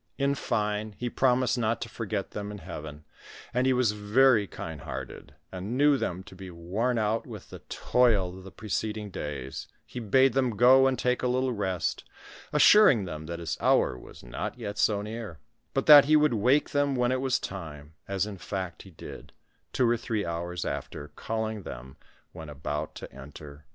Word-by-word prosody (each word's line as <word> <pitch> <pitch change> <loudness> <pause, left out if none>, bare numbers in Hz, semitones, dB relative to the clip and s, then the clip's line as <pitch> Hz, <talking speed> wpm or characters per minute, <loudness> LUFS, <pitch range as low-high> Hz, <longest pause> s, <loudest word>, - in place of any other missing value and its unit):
In 140 0 +1
fine, 105 -4 -2
he 120 -1 -3
promised 130 -1 +2
not 115 0 0
to - - -3
forget 105 -3 -4
them 105 0 -5
in 105 - -7
heaven, 75 -5 -8 0.5
and 125 +1 +1
as - - +4
he - - +4
was 125 -4 +2
veiy 105 +1 +3
kind 80 -3 -7
hearted, 70 0 -8 0.2
and 95 +6 -4
knew 145 +1 +5
them 95 -8 -3
to - - -14
be 95 0 -9
worn 95 +9 -2
out 110 +1 0
with - - -10
the - - -9
toil 105 -8 +2
of 95 - -11
the 95 - -10
preceding 105 0 -4
days, 70 -5 -6 0.2
he 125 - -7
bade 130 +3 +3
them 125 -5 0
go 130 +3 +7
and 130 -1 0
take 125 0 0
a 125 - 0
little 130 +1 0
rest, 95 -5 -2 0.5
assuring 150 - +6
them 80 -3 -7
that 85 0 -4
his 85 -1 -4
hour - - +3
was 60 - -13
not 95 - -5
yet 105 -3 -6
so 105 -2 +2
near, 110 -5 -7 0.3
but 135 - -1
that 145 -2 +10
he 155 +2 +4
would 150 -3 +4
wake 125 +7 +2
them 145 -1 +1
when 125 0 +1
it 130 0 0
was 130 -1 +1
time, 75 -5 -8
as 100 0 0
in 100 -3 -8
fact 95 -3 -5
he 95 - -13
did, 80 - -11 0.4
two 125 - +2
or 120 0 +2
three 110 -2 -2
hours 85 +1 -4
after, - - -5
calling 110 -1 -4
them 65 -5 -9 0.4
when 80 -3 -9
about 75 +1 -4
to - - -7
enter 70 +3 -11
his - - -11
agony. 75 - -21
105 Hz, 195 wpm, -28 LUFS, 85-125 Hz, 0.5 s, that